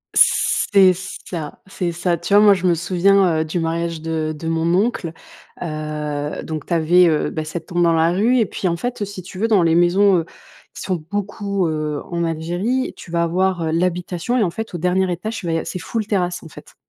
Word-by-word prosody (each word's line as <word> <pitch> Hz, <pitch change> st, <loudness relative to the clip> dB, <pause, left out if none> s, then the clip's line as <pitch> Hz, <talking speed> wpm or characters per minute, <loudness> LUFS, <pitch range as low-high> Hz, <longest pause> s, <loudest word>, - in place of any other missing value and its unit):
C'est 190 Hz, -2 st, +4 dB
ça, 175 Hz, -4 st, -7 dB
c'est 180 Hz, -2 st, -3 dB
ça. 175 Hz, 0 st, -1 dB
Tu 200 Hz, -, -3 dB
vois, 210 Hz, -, +7 dB
moi 205 Hz, -1 st, +7 dB
je 185 Hz, -1 st, 0 dB
me 170 Hz, -, +3 dB
souviens, 180 Hz, 0 st, +3 dB
heu, -, -, -1 dB
du 165 Hz, +3 st, -2 dB
mariage 165 Hz, 0 st, -2 dB
de 160 Hz, -1 st, -2 dB
de 165 Hz, -, -6 dB
mon 165 Hz, +1 st, 0 dB
oncle: 195 Hz, -5 st, 0 dB, 0.5 s
heu, 150 Hz, -2 st, -4 dB
donc 155 Hz, -3 st, -5 dB
tu 175 Hz, -, -2 dB
avais, 170 Hz, +2 st, +5 dB
heu, 155 Hz, -2 st, +1 dB
bah, 155 Hz, -, -3 dB
cette 160 Hz, +1 st, -6 dB
tombe 175 Hz, 0 st, -1 dB
dans 165 Hz, -1 st, +4 dB
la 165 Hz, +1 st, +3 dB
rue 225 Hz, +8 st, +2 dB
et 225 Hz, -, +3 dB
puis 190 Hz, -, -3 dB
en 170 Hz, 0 st, 0 dB
fait, 245 Hz, 0 st, -4 dB
heu, -, -, 0 dB
si 195 Hz, -2 st, -8 dB
tu 185 Hz, +1 st, -10 dB
veux, 225 Hz, -, +2 dB
dans 205 Hz, -6 st, +4 dB
les 165 Hz, -1 st, +3 dB
maisons, 180 Hz, +3 st, +4 dB
heu, 165 Hz, -, -4 dB, 0.5 s
qui -, -, -8 dB
sont 180 Hz, -5 st, -2 dB
beaucoup, 200 Hz, -2 st, -2 dB
heu, 155 Hz, -2 st, -2 dB
en 170 Hz, 0 st, -1 dB
Algérie, 175 Hz, +11 st, -1 dB
tu -, -, -12 dB
vas 170 Hz, 0 st, +1 dB
avoir, 180 Hz, 0 st, 0 dB
heu, 160 Hz, -, -1 dB
l'habitation, 180 Hz, +6 st, -1 dB
et 220 Hz, -, +3 dB
en 175 Hz, -, 0 dB
fait 220 Hz, -1 st, -6 dB
au -, -, -1 dB
dernier 180 Hz, +2 st, +1 dB
étage 215 Hz, +6 st, -4 dB
tu 180 Hz, -, -7 dB
vas 165 Hz, -, 0 dB
y 165 Hz, -, +1 dB
av -, -, -6 dB
c'est 185 Hz, -, -5 dB
full 215 Hz, +5 st, -3 dB
terrasse, 180 Hz, -4 st, -1 dB
en -, -, -10 dB
fait. -, -, -14 dB
175 Hz, 235 wpm, -20 LUFS, 165-195 Hz, 0.5 s, vois